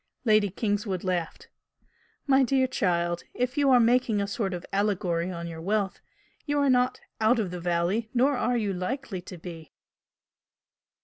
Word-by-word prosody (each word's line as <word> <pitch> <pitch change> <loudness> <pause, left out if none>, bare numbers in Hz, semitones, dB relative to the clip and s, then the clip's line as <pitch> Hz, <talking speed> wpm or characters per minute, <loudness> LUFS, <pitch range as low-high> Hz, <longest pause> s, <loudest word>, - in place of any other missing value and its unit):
Lady 215 -2 +4
Kingswood 205 -1 -2
laughed. 180 -3 -3 0.8
"My 275 -1 +4
dear 265 0 +3
child, 175 -8 0
if 250 +1 -1
you 285 -2 +3
are 255 -2 +6
making 235 -2 +3
a 200 - 0
sort 200 0 -2
of 175 -2 -5
allegory 190 -4 0
on 170 -2 -5
your 165 -1 -7
wealth, 200 +2 -1 0.5
you 290 0 0
are 280 -2 +3
not 250 0 +2 0.2
'out 220 +3 +4
of 205 -6 -1
the 180 -1 -6
valley' 175 +6 0
nor 265 +3 +3
are 245 -1 +1
you 210 -4 -1
likely 190 +1 -4
to 180 0 -10
be!" 165 -2 -10
205 Hz, 165 wpm, -27 LUFS, 180-250 Hz, 0.8 s, are